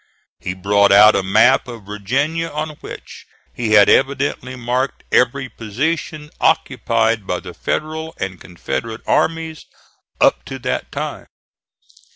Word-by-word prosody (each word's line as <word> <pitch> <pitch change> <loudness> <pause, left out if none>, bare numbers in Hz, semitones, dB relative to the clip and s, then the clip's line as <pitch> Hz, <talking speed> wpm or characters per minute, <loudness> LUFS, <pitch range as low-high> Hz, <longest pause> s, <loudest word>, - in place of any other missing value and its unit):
He 90 - -4
brought 100 +2 +3
out 105 +2 +8
a - - +2
map 100 +8 +4
of 115 -4 -9
Virginia 135 +11 -1
on 155 +1 -3
which - - -10 0.3
he 115 -3 -1
had 105 -1 +7
evidently 135 -1 +1
marked 125 +2 -2
every 130 +2 +2
position 150 +7 -3
occupied 115 -8 +1
by 90 - -1
the 90 -1 -10
Federal 160 - -3
and 95 -2 -4
Confederate 110 +6 -5
armies 160 -1 -1 0.5
up - - +3
to - - -6
that - - -3
time. - - -5
120 Hz, 130 wpm, -19 LUFS, 105-150 Hz, 0.5 s, out